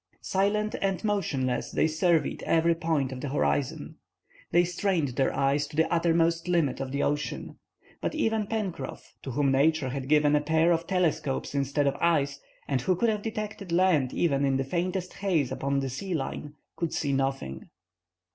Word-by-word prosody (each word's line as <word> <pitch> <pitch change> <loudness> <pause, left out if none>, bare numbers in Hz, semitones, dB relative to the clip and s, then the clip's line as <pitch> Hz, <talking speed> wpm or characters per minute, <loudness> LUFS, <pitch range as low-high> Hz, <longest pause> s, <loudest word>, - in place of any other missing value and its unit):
Silent 210 +2 +1
and 195 0 -1
motionless, 145 - -1
they - - +1
surveyed 160 +1 +1
every 165 +1 +4
point 160 -5 -1
of 130 -1 -6
the 145 - -3
horizon. 70 - -1 0.5
They 175 - +4
strained 175 -3 0
their 130 +2 +1
eyes 140 +1 +1
to - - -11
the 160 +2 +2
uttermost 165 0 +2
limit 165 -7 +1
of 135 -1 -4
the 140 +1 0
ocean. 145 +1 -3 0.4
But - - -2
even 220 -8 0
Pencroff, 195 -11 -4
to - - -7
whom 140 +1 +1
Nature 145 +1 +2
had 135 0 -5
given 150 -1 +4
a 145 - +3
pair 160 +3 +3
of 165 0 0
telescopes 155 -8 0
instead 140 +1 0
of 140 0 +1
eyes, 145 -4 +2 0.3
and 135 -3 0
who 185 +8 +2
could 230 +6 +2
have 210 -1 -1
detected 210 -4 -5
land 170 -7 +3
even 140 -5 +1
in 135 -1 +2
the 135 - 0
faintest 180 +5 -2
haze 175 -10 0
upon 140 0 -1
the 135 - -2
sea 180 +7 -3
line, 145 0 -4 0.2
could 170 -2 -2
see 145 -2 -1
nothing. 135 - -2
155 Hz, 175 wpm, -28 LUFS, 140-180 Hz, 0.5 s, every